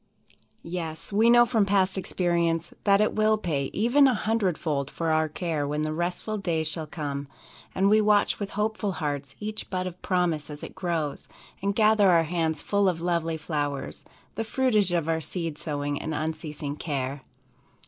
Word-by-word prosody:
Yes, 165 0 -5
we 220 +3 +5
know 240 0 +7
from 225 -2 +2
past 195 -1 +2
experience 170 -3 0
that 200 0 +5
it 215 - +2
will 215 0 +3
pay 150 -9 -1
even 250 +6 +4
a 255 - +3
hundred 215 -6 0
fold 145 -4 -2
for 165 +1 -2
all - - +3
our 160 0 +1
care 155 -2 -2
when 150 +1 -1
the 155 0 -1
restful 180 +6 -2
days 165 -5 0
shall 160 0 -3
come, 145 -3 -4 0.5
and 195 +1 +3
we 215 +2 +5
watch 210 -1 +3
with 200 -1 -3
hopeful 210 -2 0
hearts 145 -4 -4
each 215 0 -5
bud 185 -1 -2
of 180 -1 -7
promise 175 -6 0
as 150 0 -8
it - - -7
grows, 165 -5 -3 0.3
and 200 +1 0
gather 215 -2 +5
our 170 -2 +5
hands 160 -2 -1
full 200 -1 +2
of 170 -3 -2
lovely 165 -1 0
flowers, 145 -3 -3 0.3
the 225 - -2
fruitage 220 -5 +2
of 170 -3 0
our 160 0 0
seed 165 -1 -4
sowing 145 -2 -3
and 155 - -3
unceasing 150 -2 -4
care. 140 -3 -3
170 Hz, 180 wpm, -26 LUFS, 155-200 Hz, 0.5 s, know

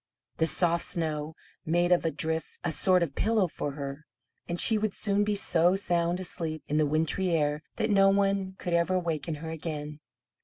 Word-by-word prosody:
The 160 - +2
soft 170 0 +4
snow 155 -2 -1 0.3
made 175 +2 +1
of 175 -1 +3
a - - +3
drift 160 +2 -3
a 175 - -1
sort 180 +2 +2
of 150 -5 -4
pillow 215 +1 +1
for 145 -3 -5
her, 140 +1 -7 0.4
and 170 0 -2
she 225 - +5
would 215 -1 -1
soon 205 0 0
be 210 0 0
so 175 -2 +3
sound 175 -2 0
asleep, 165 -4 -3
in 150 - -1
the 155 -1 +3
wintry 160 +5 +1
air, 150 -2 0
that 215 - -1
no 195 -1 +5
one 195 -1 +1
could 175 - -4
ever 170 +2 +2
waken 165 -2 -3
her 160 +2 -7
again. 150 -2 -6
170 Hz, 190 wpm, -28 LUFS, 155-185 Hz, 0.4 s, she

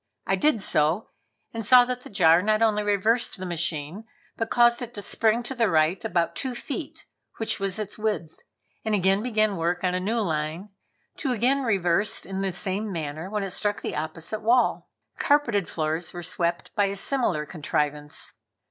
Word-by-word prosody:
I - - +2
did 295 -9 +2
so, 155 +8 +1 0.4
and 225 -1 -4
saw 245 +3 +7
that 250 0 -4
the - - -11
jar 175 -4 +5
not 215 +2 +2
only 215 -2 +3
reversed 210 +3 +1
the 185 - -6
machine, 170 +2 -3 0.3
but 225 0 -2
caused 240 0 +4
it 240 0 -6
to 205 - -4
spring 225 +3 +2
to 255 - -5
the 230 -4 +2
right 160 +2 +2
about 170 -1 0
two 260 -2 -3
feet, - - -6 0.3
which 225 - -1
was 195 -1 -1
its 210 0 -5
width, 210 -7 -2 0.4
and 220 -1 +1
again 195 +1 +2
begin 215 -4 +1
work 175 +2 -1
on 180 -1 +1
a 180 - 0
new 220 +6 -1
line, 160 0 -2 0.5
to 275 - -2
be 250 - +1
again 260 +5 +2
reversed 200 -4 +1
in 195 0 -4
the 195 -1 -1
same 195 +4 -2
manner 160 0 -4
when 210 0 -2
it 195 - -4
struck 205 +2 -2
the - - -3
opposite 160 +7 -4
wall. 240 +3 +2 0.3
Carpeted 235 - +2
floors 160 +1 -2
were 175 -1 -6
swept 170 +1 -2
by 205 -2 +2
a 200 0 -2
similar 195 - 0
contrivance. 150 -2 -3
200 Hz, 185 wpm, -25 LUFS, 170-225 Hz, 0.5 s, saw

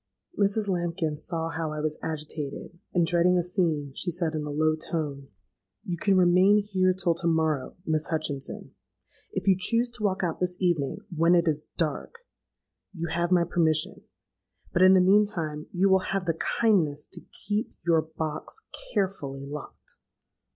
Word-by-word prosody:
Mrs. 205 -1 +1
Lambkin 170 -4 -1
saw 165 +2 -3
how 160 -1 -3
I 155 - -4
was 155 0 -1
agitated, 155 +1 -5
and, 175 -2 +2
dreading 175 +2 +3
a 175 - +2
scene, 165 -6 -1
she 175 - -2
said 170 -2 -1
in 155 - -2
a 150 - -5
low 155 +2 +2
tone, 150 -4 -3 0.6
'You 180 -5 -3
can 190 +3 +2
remain 185 +3 +5
here 185 -2 +2
till 180 -2 +1
to 170 +1 0
morrow, 160 -5 0
Miss 155 0 0
Hutchinson. 155 -4 -3 0.6
If - - -4
you 190 - +6
choose 230 +6 +1
to 235 -2 -6
walk 195 -2 0
out 170 -3 -1
this 180 0 -1
evening, 175 -1 0
when 165 +2 +4
it 170 -1 +3
is 150 -1 0
dark, 165 - -3 0.7
you 170 -1 -3
have 170 +1 0
my 175 -1 +5
permission. 160 -2 +1 0.7
But, 175 - +2
in 185 +1 +8
the 185 - +6
meantime, 180 -6 +2
you 185 +2 +2
will 190 -1 +5 0.2
have 195 -2 -1
the 165 - +1 0.3
kindness 170 -11 +2
to - - -9
keep 210 +4 -4
your 165 -2 +4
box 160 - -5 0.3
carefully 140 -9 -2
locked.' 145 +1 -9
170 Hz, 165 wpm, -27 LUFS, 155-185 Hz, 0.7 s, in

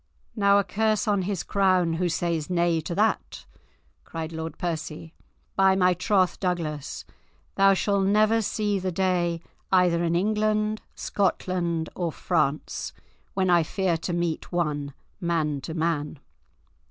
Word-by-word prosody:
"Now 200 -1 +4
a 200 - +3
curse 215 +3 0
on 205 -2 +2
his 190 -1 -2
crown, 185 -4 +2
who 175 +2 0
says 165 -2 -1
nay 170 -2 +2
to 165 +2 -5
that," 215 +3 0 0.6
cried 165 -1 -6
Lord 160 -1 -5
Percy. 160 -1 -4 0.4
"By 190 -1 +5
my 180 -1 +4
troth, 185 +1 +1
Douglas, 165 -6 -3 0.5
thou 195 0 +5
shalt 200 0 +1
never 215 +2 +4
see 210 -1 0
the 185 0 -2
day 175 -2 0 0.3
either 180 -2 +4
in 170 0 +1
England, 215 +2 +1
Scotland, 175 -4 -1
or 175 -3 -1
France, 140 0 -1 0.4
when 185 -2 +2
I 175 -1 +6
fear 180 +2 0
to 165 - -4
meet 170 -2 -2
one, 150 -5 -1 0.2
man 160 -5 0
to 160 +4 -6
man." 160 -2 -1
180 Hz, 140 wpm, -26 LUFS, 165-195 Hz, 0.6 s, I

